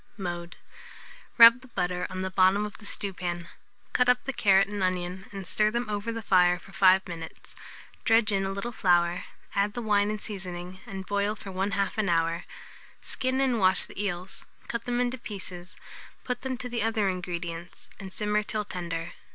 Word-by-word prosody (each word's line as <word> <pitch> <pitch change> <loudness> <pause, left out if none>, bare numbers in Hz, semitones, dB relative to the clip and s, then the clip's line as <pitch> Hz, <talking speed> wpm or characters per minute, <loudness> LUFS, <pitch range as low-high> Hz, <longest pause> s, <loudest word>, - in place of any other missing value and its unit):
Mode. 175 -3 -5 0.8
Rub 230 +1 +10
the 260 - -14
butter 180 -5 -2
on 185 0 -4
the 190 - -3
bottom 190 +2 +4
of 210 - -8
the 205 - -11
stewpan; 175 -4 -3 0.4
cut 250 0 +4
up 250 0 +4
the 275 - -2
carrot 195 -4 +4
and 205 0 -4
onion, 185 +1 -2
and 195 -2 -6
stir 210 +4 +2
them 235 +2 -2
over 210 +2 -2
the 230 0 -5
fire 180 -2 +4
for 195 - -15
5 190 +1 +5
minutes; 165 -2 -8 0.5
dredge 225 -1 +4
in 195 -1 +1
a 195 - -1
little 200 +5 -3
flour, 175 -4 +2 0.3
add 200 +1 +1
the 240 - -2
wine 205 -1 +3
and 215 0 -2
seasoning, 185 -3 -6
and 195 -3 -6
boil 205 +2 0
for 195 - -9
1/2 195 +2 -1
an 205 -3 +1
hour. 165 0 +1 0.6
Skin 260 +1 -1
and 260 -4 +2
wash 190 -1 +4
the 205 - -5
eels, 185 -1 -4 0.2
cut 235 -1 -3
them 245 0 0
into 250 +1 0
pieces, 185 -5 -6 0.5
put 250 - -3
them 260 -1 -3
to 250 - -4
the 240 -1 -2
other 220 -2 +1
ingredients, 175 -2 -5
and 190 -1 -8
simmer 210 +1 0
till 210 0 -3
tender. 170 -3 -4
195 Hz, 185 wpm, -28 LUFS, 180-215 Hz, 0.8 s, Rub